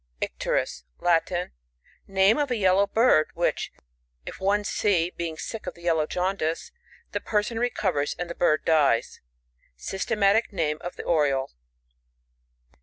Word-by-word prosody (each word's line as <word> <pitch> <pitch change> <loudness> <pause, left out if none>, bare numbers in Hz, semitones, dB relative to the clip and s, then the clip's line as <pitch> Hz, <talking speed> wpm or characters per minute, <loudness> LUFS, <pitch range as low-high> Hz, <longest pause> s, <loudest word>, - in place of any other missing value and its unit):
Icterus. - - -2
— - - -43
Latin. 175 +1 +1 0.6
(Nameof 200 +9 +3
a 245 - 0
yellow 195 -1 +3
bird, 225 -9 +4
which, - - -1 0.5
if - - -8
one 200 +2 +1
see, 180 -4 +1
being 165 -2 -4
sick 225 +5 -6
of - - -4
the 170 - -16
yellow 160 -3 +1
jaundice, 180 -3 -2 0.4
the - - -1
person 215 +2 -1
recovers, 195 -11 0
and 175 - -3
the 170 - -5
bird 155 -3 +1
dies.) 150 -7 +2 0.6
Sys« 190 - -4
tematic 215 +1 +3
name 155 -5 -1
of 175 - -6
the - - -7
Oriole. 140 -5 +1
180 Hz, 140 wpm, -26 LUFS, 160-205 Hz, 0.6 s, bird